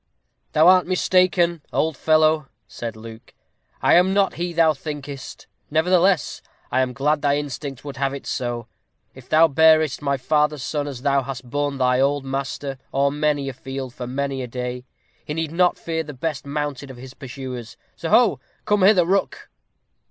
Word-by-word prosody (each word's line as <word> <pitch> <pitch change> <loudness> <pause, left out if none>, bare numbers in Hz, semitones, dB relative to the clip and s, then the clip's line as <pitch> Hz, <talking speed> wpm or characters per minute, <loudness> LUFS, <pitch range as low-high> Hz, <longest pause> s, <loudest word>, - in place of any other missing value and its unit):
"Thou 155 +2 +5
art 185 -1 +6
mistaken, 180 -2 +2
old 160 -1 0
fellow," 155 0 +3 0.2
said 115 +2 -6
Luke; 110 0 -12 0.5
"I - - +5
am 185 +2 +4
not 200 -1 +2
he 175 +1 -3
thou 165 -2 +3
thinkest; 145 -2 -8 0.2
nevertheless, 180 +4 +2 0.3
I 130 - +2
am 130 -1 0
glad 145 +3 0
thy 145 -1 +2
instinct 140 -1 -6
would 140 -2 -7
have 135 0 0
it 140 0 -7
so. 120 -2 -3 0.5
If 130 -1 -15
thou 160 +1 +6
bearest 155 -1 +4
my 140 -1 0
father's 150 +1 +1
son 145 -1 -2
as 135 -3 -7
thou 140 -1 +2
hast 130 -1 -7
borne 145 0 -1
thy 125 -1 +2
old 140 +1 +1
master, 135 0 -4
o'er 140 +1 +2
many 145 -1 0
a 135 - -4
field 135 0 -7
for 125 - -6
many 135 +1 -2
a 125 - -4
day, 125 +1 -5 0.4
he 150 - -5
need 160 -2 -2
not 180 +1 +2
fear 160 -1 -3
the 150 -3 -8
best 145 0 -4
mounted 145 -2 -4
of 130 - -10
his 130 +1 -11
pursuers. 130 -3 -8 0.2
Soho! - - +3 0.3
come 210 -1 +2
hither, 185 -2 +5
Rook." 195 +3 -1
145 Hz, 175 wpm, -22 LUFS, 130-160 Hz, 0.5 s, art